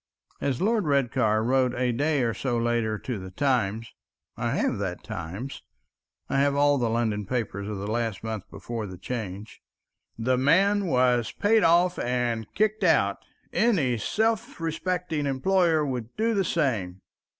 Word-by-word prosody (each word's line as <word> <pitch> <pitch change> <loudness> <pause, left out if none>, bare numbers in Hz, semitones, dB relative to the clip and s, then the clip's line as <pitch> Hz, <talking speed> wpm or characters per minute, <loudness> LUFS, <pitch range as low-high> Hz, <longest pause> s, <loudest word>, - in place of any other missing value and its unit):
As 135 -3 -1
Lord 210 -3 +1
Redcar 120 -6 +2
wrote 125 +1 +2
a 125 0 +1
day 145 +3 +1
or 115 -1 0
so 125 0 -2
later 115 -2 0
to 120 -1 -5
the 95 0 -8
Times—I 115 -1 -3
have - - 0
that - - -4
Times, 95 +12 -6 0.7
I 135 - 0
have 140 0 +2
all 145 0 +3
the 120 -2 +1
London 110 -3 -1
papers 105 -5 -3
of 105 - -4
the 100 - -5
last 115 -1 -2
month 110 -2 -5
before 115 -3 -5
the 90 -1 -9
Change— 105 0 -6 0.6
"The 125 +3 +1
man 195 +8 +3
was 125 -5 +2
paid 220 +1 +2
off 175 +2 +4
and 120 -3 -1
kicked 215 +1 +1
out. - - +3 0.3
Any 145 - +2
self 225 - -1
respecting 165 -1 -2
employer 160 +3 +2
would 125 -4 -4
do 225 +1 +1
the 195 -3 +1
same." 105 - -1
125 Hz, 150 wpm, -26 LUFS, 110-165 Hz, 0.7 s, off